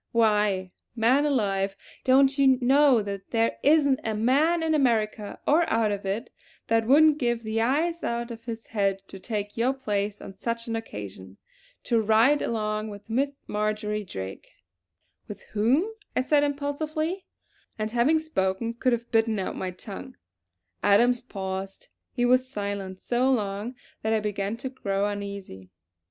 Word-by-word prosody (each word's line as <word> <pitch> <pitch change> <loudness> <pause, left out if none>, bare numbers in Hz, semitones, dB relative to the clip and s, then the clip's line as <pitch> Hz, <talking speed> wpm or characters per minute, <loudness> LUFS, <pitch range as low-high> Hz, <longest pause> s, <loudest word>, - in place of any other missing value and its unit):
Why, 210 -5 +2 0.2
man 255 +6 +3
alive, 195 -7 0 0.3
don't 270 +1 +5
you 270 -2 +5
know 265 -2 +4
that 200 -1 -6
there 230 -1 0
isn't 285 -3 +4
a 220 -1 -1
man 290 +10 +2
in 320 -1 +1
America, 220 -7 0
or 325 +3 +3
out 220 -2 +2
of 200 -1 -4
it, 205 +6 -3 0.4
that 225 -1 +2
wouldn't 300 +3 +6
give 240 -3 0
the 220 +1 -1
eyes 320 +8 +1
out 235 0 -2
of 230 0 -9
his 230 -1 -6
head 195 -3 -1
to 195 - -9
take 205 0 -4
your 250 +4 +2
place 210 -5 -2
on - - -9
such 230 +4 -3
an 230 - -3
occasion. 100 - -7 0.5
To 230 -2 +2
ride 225 +7 +4
alone 215 -1 -1
with 205 -1 -9 0.4
Marjory 210 0 -2
Drake 95 - -7 0.4
" 90 +2 -48
"With 210 - -9
whom?" 245 - +3 0.3
I - - +3
said 290 +2 +3
impulsively; 305 +5 -2 0.5
and 215 0 -2
having 245 +7 +3
spoken 230 -8 -1
could 250 +1 +1
have 235 0 -3
bitten 225 -1 +2
out 190 - -3
my 185 - -3
tongue. 95 - -9 0.7
Adams 240 +4 +4
paused; 195 -4 -6 0.2
he 245 -1 0
was 255 +1 +3
silent 200 -5 -4
so 250 +5 +1
long 210 0 -2 0.3
that 220 +1 0
I 220 - +3
began 205 0 -2
to 260 +2 -5
grow 200 -6 -1
uneasy. 200 - -6
225 Hz, 155 wpm, -26 LUFS, 200-260 Hz, 0.7 s, wouldn't